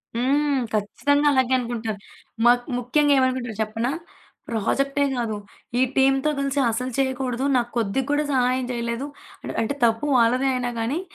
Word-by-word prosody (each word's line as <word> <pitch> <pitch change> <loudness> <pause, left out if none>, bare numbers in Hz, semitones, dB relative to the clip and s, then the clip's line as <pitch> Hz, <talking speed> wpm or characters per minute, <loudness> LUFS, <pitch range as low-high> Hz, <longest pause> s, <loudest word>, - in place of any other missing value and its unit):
హ్మ్. 275 +3 +1
ఖచ్చితంగా 285 +8 +1
అలాగే 260 -1 +2
అనుకుంటారు. 230 -4 -3 0.5
మాక్ 245 0 +4
ముఖ్యంగా 285 +4 +2
ఏమనుకుంటారు 255 -4 0
చెప్పనా? 225 +4 -2 0.6
ప్రాజెక్టే 275 +6 0
గాదు, 230 -3 -2 0.4
ఈ - - +3
టీమ్‌తో 270 +2 +3
గలిసి 275 0 -1
అసలు 250 +3 -2
చేయకూడదు. 260 -1 -1
నాకు 240 -1 +1
కొద్దిగా 230 +4 0
కూడా 295 +1 +2
సహాయం 255 -1 +1
చేయలేదు. 235 +2 -3 0.5
అంటే 225 +5 -1
తప్పు 225 +3 +2
వాళ్ళదే 250 +3 +3
అయినా 250 -1 -1
కానీ, 240 +8 -1
250 Hz, 135 wpm, -23 LUFS, 235-270 Hz, 0.6 s, మాక్